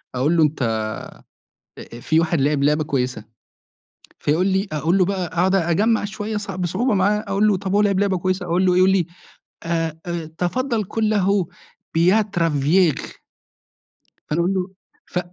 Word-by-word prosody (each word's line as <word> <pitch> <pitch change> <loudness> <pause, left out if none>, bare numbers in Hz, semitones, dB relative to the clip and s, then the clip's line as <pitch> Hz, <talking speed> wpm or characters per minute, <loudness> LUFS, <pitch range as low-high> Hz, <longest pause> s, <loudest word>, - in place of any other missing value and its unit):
أقول 145 +7 +1
له، 160 - +5
أنت 120 -7 0 1.0
آآ 120 - -10
في 160 +6 +2
واحد 165 -2 0
لعِب 145 +1 +1
لعبة 150 +2 +2
كويسة، 125 -6 -2 1.0
فيقول 165 +6 +1
لي 190 +1 0
أقول 160 +5 +1
له 185 - +4
بقى، 190 -1 -2
أقعُد 180 +3 +1
أجمّع 200 +5 +2
شوية 210 +1 -4
صع 205 -2 -5
بصعوبة 185 +7 0
معاه، 205 +2 +2
أقول 200 +2 +2
له 205 -3 +3
طَب 190 0 -4
هو 205 - +4
لعِب 200 -2 +2
لعبة 200 -2 +1
كويسة، 185 +1 -1
أقول 175 +2 +1
له، 180 -1 +3
يقول 185 +1 +5
لي 190 -3 +2 0.6
آآ 165 -1 -2
آآ، 170 -2 -4
"تفضّل 230 +5 -1
قُل 215 +2 -1
له 200 -3 +1 0.5
Beau 185 +6 +4 0.2
travail" 160 +1 +2 1.3
فأنا 150 - -1
أقوله، 185 +1 -1 0.3
ف 180 - -2
180 Hz, 160 wpm, -21 LUFS, 160-195 Hz, 1.3 s, له